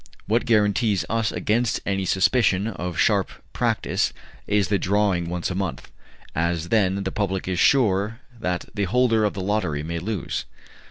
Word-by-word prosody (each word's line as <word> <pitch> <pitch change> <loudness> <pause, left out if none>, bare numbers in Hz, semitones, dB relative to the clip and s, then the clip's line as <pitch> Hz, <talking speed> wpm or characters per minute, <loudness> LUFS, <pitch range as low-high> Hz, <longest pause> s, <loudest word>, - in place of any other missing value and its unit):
What 115 +4 +1
guarantees 105 -2 +2
us 115 -1 +1
against 115 +2 0
any 95 -1 -1
suspicion 95 +1 +2
of 90 -6 -4
sharp - - +2 0.2
practice - - 0 0.3
is 100 -3 +2
the 100 -1 +2
drawing 95 -3 +1
once 90 +1 -2
a - - -1
month, 95 +1 -4 0.4
as 85 +1 -1
then 100 -3 +2
the - - -2
public 95 -3 -2
is 90 -2 -1
sure 110 -3 +3 0.2
that 90 -3 -2
the 100 -2 0
holder 115 +2 +2
of 105 - 0
the 95 - -3
lottery 95 -7 -1
may 85 +1 -3
lose." 100 -1 -3
100 Hz, 160 wpm, -24 LUFS, 90-110 Hz, 0.4 s, sure